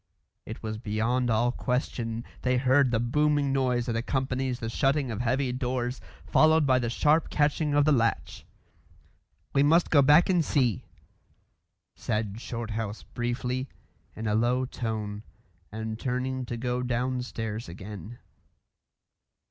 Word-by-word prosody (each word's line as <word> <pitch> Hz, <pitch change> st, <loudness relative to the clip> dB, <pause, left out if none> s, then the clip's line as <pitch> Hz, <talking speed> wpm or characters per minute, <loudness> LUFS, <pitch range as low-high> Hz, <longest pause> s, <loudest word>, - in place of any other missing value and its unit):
It 110 Hz, -, -8 dB
was 110 Hz, 0 st, -4 dB
beyond 115 Hz, +3 st, 0 dB
all 120 Hz, +2 st, +2 dB
question; 120 Hz, -3 st, -2 dB, 0.2 s
they 125 Hz, 0 st, +1 dB
heard 130 Hz, +1 st, +4 dB
the 115 Hz, -2 st, +1 dB
booming 145 Hz, +3 st, +1 dB
noise 125 Hz, -3 st, +1 dB
that 120 Hz, -2 st, -2 dB
accompanies 130 Hz, +1 st, -1 dB
the 115 Hz, -, -4 dB
shutting 135 Hz, +2 st, +1 dB
of 110 Hz, +1 st, -3 dB
heavy 130 Hz, +2 st, 0 dB
doors, 125 Hz, 0 st, -2 dB, 0.2 s
followed 155 Hz, 0 st, +4 dB
by 130 Hz, -2 st, +4 dB
the 120 Hz, -2 st, -1 dB
sharp 150 Hz, +6 st, +2 dB
catching 150 Hz, 0 st, +1 dB
of 145 Hz, -1 st, +4 dB
the 155 Hz, -, +4 dB
latch. 115 Hz, -4 st, 0 dB, 1.1 s
"We 140 Hz, -, +4 dB
must 165 Hz, +4 st, +4 dB
go 145 Hz, -, +6 dB
back 150 Hz, +5 st, +6 dB
and 180 Hz, -3 st, +3 dB
see," 125 Hz, -, 0 dB, 1.1 s
said 105 Hz, 0 st, -3 dB
Shorthouse 115 Hz, -3 st, -4 dB
briefly, 125 Hz, +2 st, -2 dB, 0.5 s
in 110 Hz, -, -6 dB
a 105 Hz, -, +1 dB
low 120 Hz, +4 st, +2 dB
tone, 110 Hz, -5 st, -4 dB, 0.5 s
and 110 Hz, +1 st, -5 dB
turning 130 Hz, 0 st, -2 dB
to 120 Hz, -, -4 dB
go 125 Hz, +1 st, -2 dB
downstairs 120 Hz, -4 st, -3 dB
again. 100 Hz, +4 st, -9 dB
125 Hz, 135 wpm, -27 LUFS, 115-135 Hz, 1.1 s, go